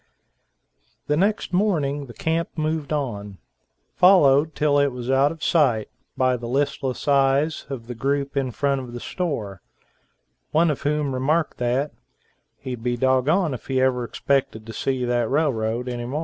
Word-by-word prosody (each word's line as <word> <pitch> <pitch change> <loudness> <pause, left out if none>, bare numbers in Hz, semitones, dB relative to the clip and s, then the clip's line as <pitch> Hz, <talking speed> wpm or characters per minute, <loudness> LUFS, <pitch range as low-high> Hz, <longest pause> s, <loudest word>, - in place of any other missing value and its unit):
The 150 - +1
next 200 +4 0
morning 150 -8 0
the 120 - -12
camp 165 +1 -1
moved 155 -1 -2
on, 105 -9 -3 0.6
followed 155 -5 +5
till 145 -1 +2
it 140 - +4
was 125 -1 -4
out 135 +2 +4
of 165 -1 -9
sight 125 -10 +2 0.3
by 130 -1 +2
the 120 0 -7
listless 135 0 -2
eyes 140 +2 +2
of 130 -5 -6
the 125 - -6
group 140 +4 -1
in 135 -2 0
front 140 +2 0
of 125 -2 -9
the 120 - -5
store, 115 - -4 0.9
one 160 +1 +3
of 145 - -4
whom 145 -1 0
remarked 150 +6 0
that, 125 +4 0 0.7
"he'd 125 -3 -6
be 120 +1 -1
doggoned 130 +7 +2
if 125 - -8
he 130 -1 0
ever 130 -1 +2
expected 120 -3 -1
to 115 - -8
see 130 0 -1
that 120 -2 0
railroad 125 -5 0
any 120 -1 -4
mo'." 140 +5 -2
135 Hz, 165 wpm, -23 LUFS, 125-150 Hz, 0.9 s, followed